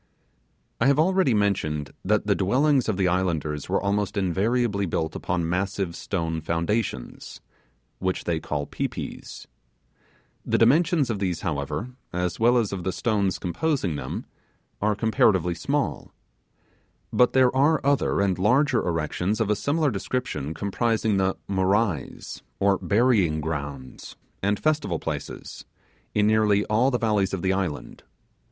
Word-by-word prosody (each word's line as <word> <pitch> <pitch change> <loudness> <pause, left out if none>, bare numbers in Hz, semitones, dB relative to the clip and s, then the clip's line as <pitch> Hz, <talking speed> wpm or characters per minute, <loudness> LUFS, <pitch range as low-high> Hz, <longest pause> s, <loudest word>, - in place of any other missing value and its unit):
I 115 - +3
have 140 0 +4
already 180 -5 +3
mentioned 75 -8 0
that 105 +3 +1
the 105 - +3
dwellings 130 +7 +2
of 105 - 0
the 95 -2 +2
islanders 80 -5 -1
were - - +2
almost 100 +1 -1
invariably 100 +2 +1
built 80 -1 -2
upon 90 -2 -1
massive 95 0 -2
stone 80 -4 -3
foundations, 85 - -3 0.6
which 95 -1 -1
they 85 -2 -1
call 75 -2 -3
pi - - -2
pis. - - -8 1.0
The - - +1
dimensions 145 +2 +3
of 105 - -3
these, 90 -4 -2
however, 75 - -3 0.2
as 90 0 -2
well 120 +2 +4
as 110 -4 0
of 95 -3 -4
the 95 - -1
stones 100 +1 0
composing 100 - -1
them, - - -5 0.6
are 105 +1 +2
comparatively 100 -5 +2
small: 140 - -2 1.0
but 125 - +4
there 130 -1 +4
are 145 +4 +4
other 140 -7 +2
and 95 -2 +1
larger 125 +5 +3
erections 85 +5 -1
of 110 -2 +1
a - - +3
similar 145 +5 +1
description 100 - -3
comprising 110 +1 0
the 95 0 +1
'morais', 95 - -1 0.2
or 100 -1 +3
burying 100 -8 +2
grounds, 70 -4 -6 0.3
and 100 +1 0
festival 150 - 0
places, - - -6 0.5
in 105 - +3
nearly 105 -1 +3
all 115 +5 +2
the 125 - 0
valleys 105 -4 +1
of 95 - -6
the 95 0 +2
island. 90 -6 -4
100 Hz, 140 wpm, -25 LUFS, 90-115 Hz, 1.0 s, have